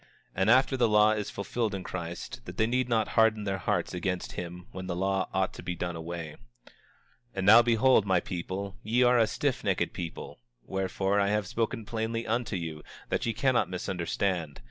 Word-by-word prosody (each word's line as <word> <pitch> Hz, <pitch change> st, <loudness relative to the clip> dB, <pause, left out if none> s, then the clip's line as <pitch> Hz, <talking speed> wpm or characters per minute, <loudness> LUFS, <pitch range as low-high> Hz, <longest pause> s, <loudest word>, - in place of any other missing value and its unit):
And 95 Hz, +3 st, +1 dB
after 130 Hz, +3 st, +5 dB
the 120 Hz, -3 st, +3 dB
law 105 Hz, 0 st, +5 dB
is 105 Hz, -1 st, -2 dB
fulfilled 105 Hz, +1 st, -2 dB
in 95 Hz, -, -5 dB
Christ, 85 Hz, +7 st, -6 dB
that -, -, -9 dB
they 110 Hz, -, +3 dB
need 125 Hz, +2 st, 0 dB
not 115 Hz, -2 st, +1 dB
harden 110 Hz, -1 st, +3 dB
their 95 Hz, -1 st, -2 dB
hearts -, -, -1 dB
against 90 Hz, 0 st, -2 dB
him 90 Hz, 0 st, -7 dB
when 95 Hz, 0 st, -7 dB
the 90 Hz, -, -2 dB
law 95 Hz, +1 st, 0 dB
ought 95 Hz, -1 st, 0 dB
to -, -, -9 dB
be 90 Hz, 0 st, -4 dB
done 85 Hz, 0 st, -3 dB
away. 80 Hz, -1 st, -6 dB, 0.3 s
25:28 -, -, -18 dB, 0.6 s
And 95 Hz, -1 st, -2 dB
now 110 Hz, +4 st, +9 dB
behold, 115 Hz, -2 st, +4 dB
my 95 Hz, -2 st, +4 dB
people, 95 Hz, +3 st, -5 dB
ye 120 Hz, +4 st, +2 dB
are 125 Hz, 0 st, +5 dB
a 115 Hz, -, +5 dB
stiffnecked -, -, -1 dB
people; 85 Hz, -2 st, -7 dB, 0.3 s
wherefore, 95 Hz, +1 st, 0 dB
I 100 Hz, -, +2 dB
have 105 Hz, 0 st, +1 dB
spoken 110 Hz, +2 st, -2 dB
plainly 115 Hz, 0 st, -2 dB
unto 115 Hz, -1 st, -1 dB
you, 80 Hz, -3 st, -4 dB, 0.3 s
that -, -, 0 dB
ye 115 Hz, -, 0 dB
cannot 125 Hz, +2 st, +2 dB
misunderstand. 90 Hz, -3 st, -2 dB
100 Hz, 190 wpm, -29 LUFS, 90-115 Hz, 0.6 s, now